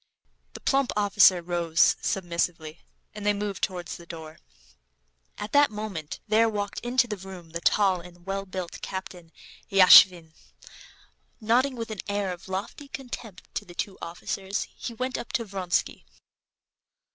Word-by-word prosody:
The -, -, -8 dB
plump 275 Hz, -1 st, +2 dB
officer 200 Hz, -3 st, +5 dB
rose 170 Hz, -2 st, +3 dB
submissively, 170 Hz, -3 st, -2 dB, 0.3 s
and 210 Hz, -1 st, -8 dB
they 210 Hz, 0 st, +3 dB
moved 205 Hz, -1 st, -4 dB
towards 180 Hz, -4 st, -3 dB
the 170 Hz, -, -14 dB
door. 160 Hz, -2 st, -9 dB, 1.0 s
At 210 Hz, -, -6 dB
that 290 Hz, 0 st, +5 dB
moment 210 Hz, -8 st, -6 dB
there 225 Hz, +2 st, +4 dB
walked 205 Hz, -2 st, -3 dB
into 245 Hz, +1 st, +2 dB
the 210 Hz, -3 st, -4 dB
room 185 Hz, -3 st, -11 dB
the 170 Hz, +1 st, -5 dB
tall 190 Hz, -1 st, +3 dB
and 175 Hz, 0 st, -15 dB
well 195 Hz, 0 st, -3 dB
built 185 Hz, -2 st, -6 dB
Captain 180 Hz, -3 st, -7 dB, 0.4 s
Yashvin. 185 Hz, -3 st, +8 dB, 1.1 s
Nodding 250 Hz, +5 st, +2 dB
with 230 Hz, -2 st, -5 dB
an 215 Hz, -, -6 dB
air 200 Hz, -2 st, -1 dB
of 175 Hz, -, -12 dB
lofty 200 Hz, +9 st, -5 dB
contempt 245 Hz, -8 st, -9 dB
to -, -, -3 dB
the 175 Hz, -3 st, -14 dB
two 195 Hz, +1 st, -4 dB
officers, 190 Hz, +3 st, -4 dB
he 235 Hz, -, -6 dB
went 255 Hz, +2 st, -2 dB
up -, -, -8 dB
to 230 Hz, -, 0 dB
Vronsky. 190 Hz, -3 st, -2 dB
195 Hz, 145 wpm, -26 LUFS, 175-215 Hz, 1.1 s, Yashvin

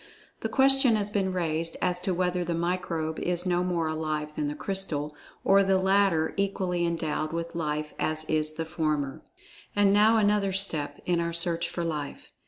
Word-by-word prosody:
The -, -, -3 dB
question 270 Hz, -3 st, +5 dB
has 205 Hz, -1 st, -1 dB
been 195 Hz, -2 st, 0 dB
raised 165 Hz, -2 st, -2 dB
as 180 Hz, -1 st, 0 dB
to 185 Hz, +1 st, -2 dB
whether 180 Hz, 0 st, 0 dB
the 170 Hz, 0 st, -2 dB
microbe 165 Hz, -2 st, -2 dB
is 175 Hz, 0 st, -2 dB
no 180 Hz, -1 st, +1 dB
more 175 Hz, -3 st, 0 dB
alive 155 Hz, -1 st, -3 dB
than 150 Hz, -, -1 dB
the 145 Hz, -, -3 dB
crystal, 150 Hz, -5 st, -3 dB, 0.3 s
or 195 Hz, 0 st, +5 dB
the 195 Hz, -1 st, +3 dB
latter 190 Hz, -4 st, +2 dB
equally 185 Hz, -3 st, 0 dB
endowed 155 Hz, -2 st, -2 dB
with 170 Hz, 0 st, -4 dB
life 150 Hz, -2 st, -3 dB
as 155 Hz, 0 st, -1 dB
is 155 Hz, 0 st, -1 dB
the 160 Hz, +1 st, -4 dB
former." 150 Hz, -4 st, -2 dB, 0.5 s
And 205 Hz, -1 st, +4 dB
now 215 Hz, +2 st, +5 dB
another 205 Hz, -2 st, +2 dB
step, 160 Hz, -7 st, 0 dB
in 175 Hz, -1 st, +1 dB
our 170 Hz, 0 st, -1 dB
search 170 Hz, 0 st, 0 dB
for 170 Hz, -, -3 dB
Life. 150 Hz, -4 st, -5 dB
170 Hz, 180 wpm, -27 LUFS, 155-190 Hz, 0.5 s, question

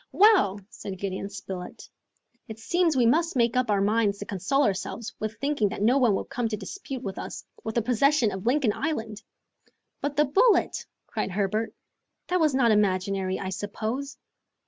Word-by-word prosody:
"Well," 380 Hz, -, +5 dB
said 195 Hz, -3 st, -8 dB
Gideon 195 Hz, +1 st, -4 dB
Spilett, 190 Hz, -3 st, -8 dB, 0.6 s
"it 220 Hz, -, -8 dB
seems 335 Hz, +5 st, +1 dB
we 245 Hz, -, +4 dB
must 330 Hz, +8 st, +2 dB
make 235 Hz, -1 st, +2 dB
up 250 Hz, -2 st, +1 dB
our 200 Hz, -1 st, +2 dB
minds 205 Hz, 0 st, +2 dB
to 205 Hz, -, -6 dB
console 210 Hz, +10 st, 0 dB
ourselves 210 Hz, +1 st, -2 dB
with 215 Hz, +1 st, -4 dB
thinking 275 Hz, -7 st, +1 dB
that 200 Hz, -, -4 dB
no 250 Hz, +5 st, +4 dB
one 235 Hz, -6 st, +4 dB
will -, -, -2 dB
come 245 Hz, -2 st, -2 dB
to 215 Hz, -1 st, -3 dB
dispute 270 Hz, -, -7 dB
with 195 Hz, -, -5 dB
us -, -, -7 dB, 0.2 s
the 225 Hz, +1 st, -1 dB
possession 250 Hz, 0 st, +3 dB
of 190 Hz, +3 st, -5 dB
Lincoln 255 Hz, -4 st, +3 dB
Island!" 225 Hz, -8 st, -3 dB, 0.8 s
"But 285 Hz, 0 st, -2 dB
the 300 Hz, +1 st, +4 dB
bullet," 405 Hz, -, +3 dB, 0.2 s
cried -, -, -3 dB
Herbert. 205 Hz, +3 st, -1 dB, 0.5 s
"That 365 Hz, 0 st, +2 dB
was 305 Hz, -5 st, +3 dB
not 240 Hz, -4 st, +4 dB
imaginary, 190 Hz, -2 st, +1 dB
I 190 Hz, -, -4 dB
suppose!" 220 Hz, +8 st, -4 dB
225 Hz, 170 wpm, -26 LUFS, 200-275 Hz, 0.8 s, Well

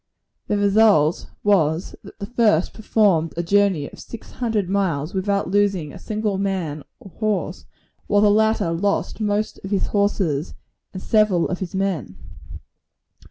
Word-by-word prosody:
The 210 Hz, -, 0 dB
result 200 Hz, -6 st, +3 dB
was, 170 Hz, -4 st, +1 dB
that 200 Hz, -, -13 dB
the 200 Hz, -, -5 dB
first 210 Hz, -7 st, +2 dB
performed 200 Hz, -7 st, +1 dB
a 170 Hz, -, -1 dB
journey 190 Hz, -5 st, +2 dB
of -, -, -13 dB
six 230 Hz, -, -10 dB
hundred 220 Hz, -6 st, -1 dB
miles 180 Hz, -6 st, -1 dB
without 200 Hz, -1 st, -1 dB
losing 195 Hz, -7 st, +1 dB
a -, -, -10 dB
single 210 Hz, -2 st, -2 dB
man 180 Hz, -7 st, -2 dB, 0.2 s
or 195 Hz, -, -13 dB
horse; 215 Hz, -2 st, -2 dB, 0.4 s
while 205 Hz, -1 st, +3 dB
the 205 Hz, -, +5 dB
latter 215 Hz, -4 st, +2 dB
lost 200 Hz, +7 st, -1 dB
most 210 Hz, 0 st, -1 dB
of 195 Hz, -, -6 dB
his 200 Hz, -2 st, 0 dB
horses, 190 Hz, -7 st, 0 dB, 0.4 s
and 185 Hz, -, -8 dB
several 215 Hz, -6 st, +2 dB
of 180 Hz, -, -3 dB
his 185 Hz, -1 st, -5 dB
men. 180 Hz, -, -2 dB
200 Hz, 150 wpm, -22 LUFS, 170-210 Hz, 0.4 s, the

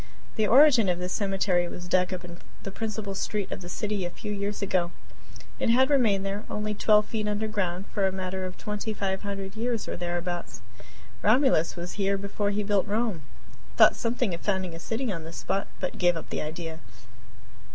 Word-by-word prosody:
The 215 Hz, -2 st, +2 dB
original 245 Hz, -7 st, +7 dB
of -, -, -6 dB
this 180 Hz, +1 st, -3 dB
cemetery 195 Hz, -3 st, +1 dB
was 175 Hz, 0 st, -7 dB
dug 180 Hz, +1 st, +2 dB
up 185 Hz, -1 st, -4 dB
in 170 Hz, 0 st, -10 dB, 0.2 s
the 195 Hz, -, -5 dB
principal 215 Hz, -1 st, -3 dB
street 200 Hz, 0 st, -2 dB
of -, -, -4 dB
the 175 Hz, -, -8 dB
city 205 Hz, +1 st, -2 dB
a 175 Hz, -, -2 dB
few 210 Hz, +4 st, -6 dB
years 205 Hz, 0 st, -2 dB
ago. 180 Hz, -3 st, +1 dB, 0.7 s
It -, -, +1 dB
had 260 Hz, +4 st, +5 dB
remained 215 Hz, -8 st, +3 dB
there, 200 Hz, +2 st, -2 dB
only 210 Hz, 0 st, -2 dB
twelve 210 Hz, 0 st, +4 dB
feet 215 Hz, -2 st, -2 dB
underground, 205 Hz, -4 st, -1 dB
for 195 Hz, -2 st, +2 dB
a -, -, 0 dB
matter 185 Hz, 0 st, -3 dB
of 185 Hz, 0 st, -5 dB
twenty 210 Hz, +1 st, -3 dB
five 190 Hz, -1 st, -1 dB
hundred 195 Hz, -1 st, -5 dB
years 230 Hz, 0 st, -1 dB
or -, -, -3 dB
thereabouts. 175 Hz, -, -3 dB, 0.6 s
Romulus 220 Hz, -, +4 dB
was 175 Hz, 0 st, -5 dB
here 195 Hz, 0 st, +2 dB
before 200 Hz, +1 st, -2 dB
he 205 Hz, +1 st, 0 dB
built 205 Hz, -1 st, +1 dB
Rome, 210 Hz, -4 st, 0 dB, 0.5 s
and -, -, -21 dB
thought -, -, +8 dB
something 230 Hz, -3 st, 0 dB
of 170 Hz, -, -5 dB
founding 190 Hz, -4 st, -1 dB
a 165 Hz, -, -7 dB
city 225 Hz, +6 st, -2 dB
on 165 Hz, -4 st, -4 dB
this 165 Hz, +1 st, -8 dB
spot, 195 Hz, -, -1 dB
but -, -, -3 dB
gave 175 Hz, -2 st, +4 dB
up 165 Hz, -, -8 dB
the -, -, -1 dB
idea. 160 Hz, +1 st, -5 dB
195 Hz, 200 wpm, -27 LUFS, 180-210 Hz, 0.7 s, thought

